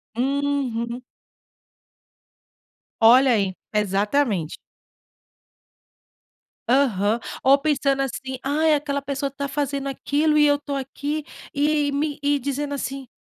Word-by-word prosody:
Uhum. 255 -2 -1 2.0
Olha 250 +3 +7
aí, 195 -4 +1 0.2
exatamente. 205 - 0 2.1
Aham. 230 -5 +2 0.2
Ou 270 +1 +6
pensando 275 -2 +1
assim: 265 0 -4
"Ai, 305 +3 +2
aquela 285 -1 -1
pessoa 275 0 -3
tá 280 +1 -4
fazendo 280 0 -2
aquilo 295 +3 +1
e 300 - +6
eu 290 0 +3
tô 285 -1 -5
aqui". 285 +3 -4 0.3
E 290 0 +1
me 290 +1 -2
e 285 0 +2
dizendo 285 +2 -3
assim, 270 -1 -5
275 Hz, 105 wpm, -23 LUFS, 250-285 Hz, 2.1 s, Olha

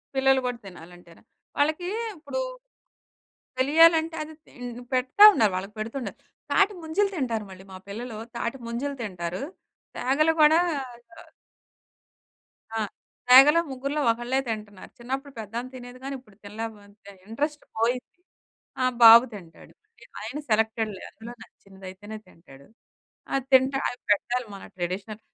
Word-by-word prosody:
పిల్లలు 270 0 +4
గూడా 245 -1 -2
తినాలంటేనా? 175 -1 -14 0.4
వాళ్ళకి 310 +5 +1 0.3
ఇప్పుడు, 345 +11 -4 1.2
తెలియాలంటే 320 +4 +5
అది 310 +1 -9
తిం 250 - -12 0.3
పెడతా 255 +11 +5
ఉన్నారు, 215 - +3
వాళ్ళకి 195 +3 -6
పెడతుండాలి. 230 +4 -5 0.3
తాటి 415 - +4
ముంజలు 390 +6 0
తింటారు 235 - -2
మళ్ళీ 190 0 -12
మా - - -8
పిల్లలు 225 +3 -6 0.2
తాటి 235 +2 -3
ముంజలు 265 +5 -3
తింటారు. 180 -3 -5 0.5
తేగలు 305 +5 +2
కూడా 305 +2 +7 0.2
ఆహ్ 240 -3 -11 1.5
ఆ! - - 0 0.5
తేగలో 275 +6 +9
ముగ్గురిలో 275 +3 -3
ఒకళ్ళే 240 +3 -2
తింటన్నారు. 210 -3 -6
చిన్నప్పుడు 265 +4 -5
పెద్ధా 220 +1 -6
ఆమె 255 - -9
తినేది 245 0 -10
గాని 275 +1 -4
ఇప్పుడు 215 -6 -22
తినలేపోతుంది 205 -1 -9 0.2
ఇంట్రెస్ట్ 295 +7 -3
పోయింది. 245 +6 -1 0.6
ఆ! - - +2 0.2
బాబు 230 +1 +11
తింటాడు. 175 -5 -13 0.5
ఆయన 290 - -5
సెలెక్టెడ్‌లే 220 -2 0
అందులో 230 +2 -11
నచ్చినదయితేనే 195 0 -11
తింటాడు. 140 -6 -18 0.7
అది 270 -2 0
తింట 260 +1 +5 0.2
అవి 245 - -6
పెట్టాలి 240 +4 +1
మన 195 - -10
ట్రెడిషనల్ 190 +4 -4
235 Hz, 125 wpm, -26 LUFS, 205-270 Hz, 1.5 s, బాబు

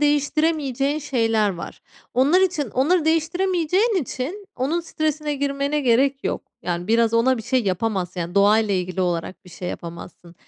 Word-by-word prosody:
değiştiremeyeceğin 290 -1 +1
şeyler 225 -7 +1
var. 175 -3 -8 0.3
Onlar 285 +9 +4
için, 320 - 0
onları 310 +6 +2
değiştiremeyeceğin 360 +5 +1
için 335 +12 -5
onun 290 +7 0
stresine 310 -2 -2
girmene 280 +1 -1
gerek 270 +2 +2
yok. - - -2 0.2
Yani, 175 0 -3
biraz 230 0 +3
ona 250 +3 +3
bir - - -6
şey 255 +2 +1
yapamazsın, 185 -2 -1
yani, 170 +2 -5
doğayla 205 +1 +4
ilgili 180 0 -2
olarak 175 +1 -2
bir 180 - -14
şey 180 +1 -6
yapamazsın 170 0 -9
260 Hz, 150 wpm, -22 LUFS, 200-305 Hz, 0.3 s, Onlar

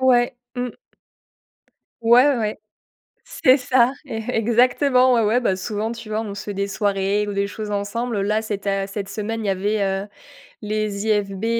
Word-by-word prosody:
Ouais, 250 -1 +3 0.2
mmh. 245 0 -2 1.3
Ouais 240 +4 +7
ouais 280 - +2
ouais, 215 -2 -2 0.7
c'est 255 +1 +4
ça, 250 -1 +3
é-exactement, 250 +2 +2
ouais, - - +3
ouais, 225 +3 +2
bah, 190 -6 +1
souvent, 210 +3 -3
tu 230 -1 -8
vois, 215 +1 -2
on 210 -3 -5
se 200 - -7
fait 205 - -4
des 200 0 -2
soirées, 200 0 0
ou 205 - -3
des 200 0 0
choses 210 +1 -6
ensemble 205 +2 -2
là, 210 +2 +1
c'éta 200 -2 -2
cette 195 0 -5
semaine 220 +2 -4
il - - -2
y - - +2
avait, 200 +2 0
heu, 195 +1 -1 0.5
les 210 -1 -2
IFB, 205 -1 0
215 Hz, 170 wpm, -22 LUFS, 200-235 Hz, 1.3 s, Ouais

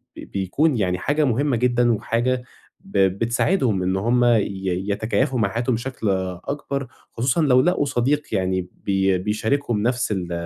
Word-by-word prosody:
بيكُون 120 - -1
يعني 90 -4 0
حاجة 150 - +1
مهمة 135 +2 +1
جدًا 120 0 +2
وحاجة 120 +3 -1 0.4
ب 195 0 -6
بتساعدهم 110 - +1
إن 95 +1 0
هُم 120 +5 +2
ي 120 -3 +4 0.5
يتكيّفوا 125 +5 0
مع 100 -3 +2
حياتهم 120 +3 -1
بشكل 120 -2 -3 0.4
أكبَر، 140 -1 -3 0.3
خصوصًا 125 +7 +1
لو 130 -4 +5
لقوا 170 -3 +1
صديق 140 +3 0
يعني 95 -1 -1 0.2
بي 95 -1 +2
بيشاركهم 110 +3 -1
نَفْس 120 -2 0
ال 90 -3 -3
120 Hz, 145 wpm, -22 LUFS, 100-135 Hz, 0.5 s, لو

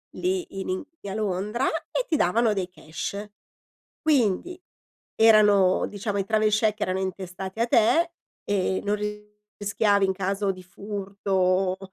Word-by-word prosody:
lì 360 - -2
in 190 - -4
Ing 185 +9 -2 0.2
a 195 - -4
Londra, 210 +4 -1 0.3
e - - -1
ti 315 - +2
davano 225 +4 +3
dei 190 -3 -1
cash. 190 +4 -6 0.8
Quindi 310 - +1 0.5
erano 210 -4 +5
diciamo, 205 0 -3
i 195 - -1
travel 215 +1 +2
check 215 0 +1
erano 185 +1 0
intestati 190 +1 -5
a - - +4
te, 245 +10 +3 0.3
e 190 -2 0
non 205 +1 0 0.6
rischiavi 205 0 +2
in 190 - +1
caso 195 +1 -1
di 185 -1 -11
furto, 190 -1 -1
200 Hz, 135 wpm, -25 LUFS, 190-220 Hz, 0.8 s, erano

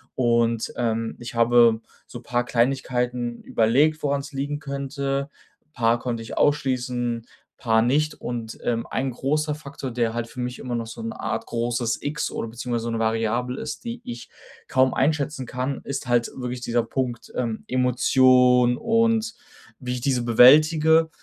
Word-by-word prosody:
Und, 115 -2 +1
ähm, 115 -1 -1
ich 120 0 -8
habe 115 -1 +5 0.3
so 120 - -9
paar 120 +1 -1
Kleinigkeiten 125 -1 -1
überlegt, 145 +8 +2
woran's 140 +1 -2
liegen 140 +2 -2
könnte. 140 0 -3 0.4
Paar 115 0 +2
konnte 115 -2 -3
ich - - -8
ausschließen, 125 -5 0 0.3
paar 110 -2 +2
nicht. 150 +6 +1
Und, 115 -2 -6
ähm, 115 -1 -1
ein 135 +1 -1
großer 150 +4 -1
Faktor, 140 -3 -7
der 115 -1 0
halt 120 -1 -3
für 125 - -11
mich 125 0 -4
immer 125 -2 -4
noch 115 -1 -2
so 115 - -8
'ne 225 0 -6
Art - - -3
großes 120 0 -1
X 145 +1 -2
oder - - -4
beziehungsweise 120 0 -3
so 115 - -2
'ne 115 - -2
Variable 115 +3 -1
ist, - - -6
die 235 0 -5
ich 120 - -8 0.4
kaum 130 0 +3
einschätzen 140 -2 0
kann, 130 +2 -3
ist 140 -1 -5
halt 120 -1 +2
wirklich 125 -1 -4
dieser 120 -1 0
Punkt, 120 0 -4
ähm, 115 -3 -2
Emotion 125 -1 +4
und 230 0 +1 0.5
wie 125 -2 -4
ich 125 - -4
diese 130 -1 +1
bewältige. 155 +7 +6
125 Hz, 160 wpm, -24 LUFS, 120-140 Hz, 0.5 s, bewältige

